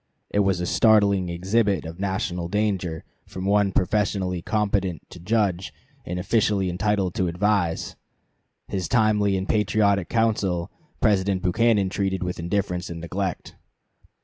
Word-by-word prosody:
It 100 - +1
was 95 -3 +2
a 90 - -2
startling 100 -2 +3
exhibit 95 +1 0
of 80 +2 -8
national 95 -3 -2
danger 95 -5 -1 0.2
from 95 0 -6
one 100 0 +3
professionally 95 -2 0
competent 100 -4 -1
to 90 - -10
judge 95 -1 0 0.4
and 90 - -3
officially 100 -1 +1
entitled 95 0 0
to 95 - 0
advise. 90 -1 0 0.7
His 95 -4 -3
timely 105 -3 +2
and 95 +1 -3
patriotic 100 -2 +2
counsel 105 -7 0 0.3
President 100 -3 +2
Buchanan 105 +1 +2
treated 95 -1 -1
with 90 0 -4
indifference 90 0 -2
and 85 -1 -6
neglect. 90 +2 -4
95 Hz, 130 wpm, -24 LUFS, 90-105 Hz, 0.7 s, startling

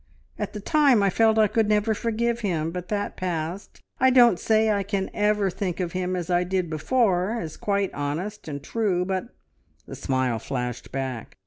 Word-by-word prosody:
At - - -3
the 210 - -5
time 275 -2 +4
I 195 - +3
felt 220 +2 +3
I 220 - +6
could 215 +1 +1
never 210 +1 +2
forgive 235 +2 -1
him, 165 -7 -1
but 180 0 -6
that 205 -1 -2
passed. 175 +1 -4 0.2
I 260 - +5
don't 240 -8 +6
say 220 +2 +3
I 200 -1 +1
can 195 -1 -2
ever 210 -2 +1
think 180 -1 -3
of 175 -2 -2
him 185 0 -2
as 175 -2 -3
I 175 0 +3
did 180 -2 -2
before, 200 - +1
as 160 -5 -6
quite 200 -2 -1
honest 165 +9 -4
and 140 -2 -5
true, 190 -2 0
but 190 +3 -2 0.3
" - - -39
The - - -8
smile 130 -4 -1
flashed 125 -2 -4
back. 130 -4 -5
190 Hz, 195 wpm, -25 LUFS, 170-215 Hz, 0.3 s, I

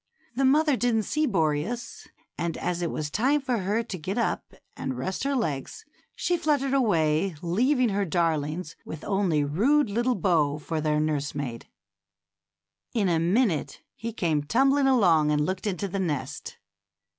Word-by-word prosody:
The 270 +2 +2
mother 295 +2 +4
didn't 235 -3 +1
see 305 +7 0
Boreas, 165 +4 -1 0.3
and 170 -1 -3
as 175 -1 -2
it 170 - -1
was 150 -1 -4
time 270 - +2
for 255 -4 -1
her 205 +5 0
to 205 -4 -6
get 185 +7 -4
up 235 - -2 0.2
and 130 -2 -4
rest 190 - -3
her 280 0 +1
legs, 220 - -3 0.3
she 355 - 0
fluttered 290 -4 +1
away, 170 - +2
leaving 245 - +2
her 200 0 0
darlings 165 -2 -1
with 155 - -8
only 190 -7 +1
rude 225 - +2
little 240 +4 +1
Bo 155 -6 +2
for 155 +1 -3
their 150 0 +1
nursemaid. 145 -5 -2 1.3
In 205 -5 +2
a 165 -2 +2
minute 180 - +1
he 230 +1 -5
came 165 -8 0
tumbling 270 - +3
along 175 - +4
and 150 0 +2
looked 185 +3 -3
into 200 0 -2
the 195 +1 -3
nest. 145 -8 -3
190 Hz, 155 wpm, -26 LUFS, 155-245 Hz, 1.3 s, mother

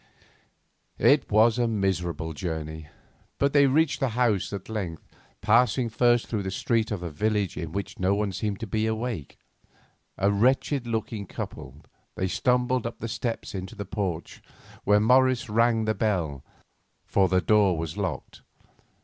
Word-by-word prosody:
It - - +3
was 110 +3 +4
a 120 - +2
miserable 90 -6 -1
journey, 80 -1 -5 0.5
but 140 0 +1
they 140 -1 +6
reached 150 +3 +2
the 135 - +1
house 115 -4 +1
at 100 -2 -6
length, 95 -8 -5 0.3
passing 120 +2 +3
first 120 +1 +3
through 110 - -2
a 95 -1 -3
street 110 +3 0
of 105 -5 -3
the 85 -2 -5
village 105 +3 0
in 80 -2 -5
which 100 +3 -5
no 95 +2 +2
one 105 -1 -1
seemed 100 +1 -3
to - - -2
be 110 +1 -1
awake. 110 - -4 0.8
A 100 +2 +2
wretched 125 +4 +1
looking 110 -3 -3
couple, - - -8 0.3
they 95 - -1
stumbled 125 +3 +1
up 115 - -7
the 115 - -5
steps 115 +1 -4
into 95 -1 -6
the 100 - -5
porch, 90 -6 -4 0.4
where 105 +1 +5
Morris 125 +1 +3
rang 115 0 +3
the 110 - +1
bell, 90 -10 -1 0.6
for 95 -1 +2
the 95 - +3
door 100 0 +3
was 80 0 -4
locked. 95 -9 -4
105 Hz, 160 wpm, -26 LUFS, 95-115 Hz, 0.8 s, they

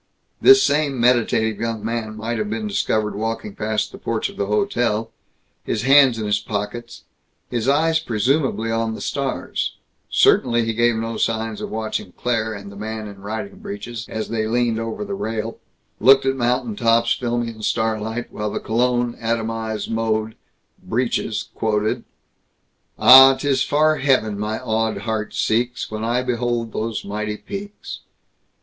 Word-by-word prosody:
This 400 0 +8
same 145 -3 +1
meditative 115 -3 +2
young 115 -2 -3
man 115 -1 -3
might 115 +1 -3
have 105 -1 -2
been 110 0 -3
discovered 105 +1 0
walking 110 0 -3
past 105 +1 -2
the - - -11
porch - - -2
of - - -12
the 100 - -2
hotel, 115 - 0 0.5
his 115 - -2
hands 135 -2 +6
in 110 - -3
his 105 -1 +1
pockets, 105 +3 -5 0.5
his 120 -1 -1
eyes 160 +3 +3
presumably 125 -2 0
on 115 0 -1
the - - -8
stars 140 -2 -3 0.3
certainly 120 -1 +3
he 115 - -1
gave 120 +1 +2
no 115 0 -3
signs 110 -1 -1
of - - -4
watching 110 -4 -4
Claire 115 -2 -1
and 100 -2 -8
the - - -12
man 110 +1 -5
in 100 -1 -11
riding 110 - -6
breeches 200 - -7
as 110 0 -4
they 110 -1 -1
leaned 115 -1 +1
over 115 - -4
the 200 - -5
rail, 110 - -4 0.4
looked 135 0 +6
at 135 0 +1
mountain 120 -2 0
tops 115 +1 +3
filmy 120 -1 -2
in 110 -1 -10
starlight, 110 +1 -1
while 105 - -3
in - - -4
the - - -2
cologne 120 +1 0
atomized 115 -1 -2
mode, 110 -1 -1 0.5
Breeches - - -2
quoted: 110 -1 -1 0.9
Ah, 135 +1 +9
'tis 135 -1 0
far 155 +2 +3
heaven 110 -7 +1
my 105 +1 -2
awed 110 -4 -1
heart 110 -1 -3
seeks 120 +2 0
When 110 0 -4
I 120 +2 0
behold 120 -2 -1
those 110 0 -3
mighty 105 +1 -3
peaks. 200 - -8
115 Hz, 160 wpm, -21 LUFS, 110-125 Hz, 0.9 s, Ah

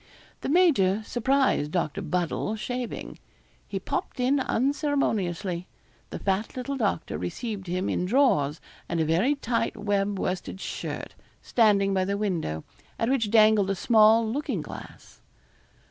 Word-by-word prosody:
The - - -4
major 260 - +3
surprised 255 - +1
Doctor 155 -3 -1
Buddle 180 +4 -1
shaving. 245 +2 -5 0.5
He - - -3
popped - - -4
in 265 +3 +2
unceremoniously. 225 - 0 0.4
The - - -5
fat 195 +5 -2
little 275 +2 -3
doctor 205 -10 -1
received 195 - -4
him 185 +2 -1
in 180 - 0
drawers 195 - +2 0.3
and 170 - -1
a 160 - +2
very 185 - +2
tight 235 -4 -1
web 205 -1 0
worsted 185 0 -3
shirt, - - -5 0.3
standing 200 -4 +3
by 190 -1 +1
the 200 +1 -1
window, 170 - -2 0.3
at 225 - 0
which 230 -6 +1
dangled 215 -2 +5
a 195 - +1
small 220 +2 +5
looking 275 +7 -2
glass. - - -11
210 Hz, 135 wpm, -26 LUFS, 185-245 Hz, 0.5 s, dangled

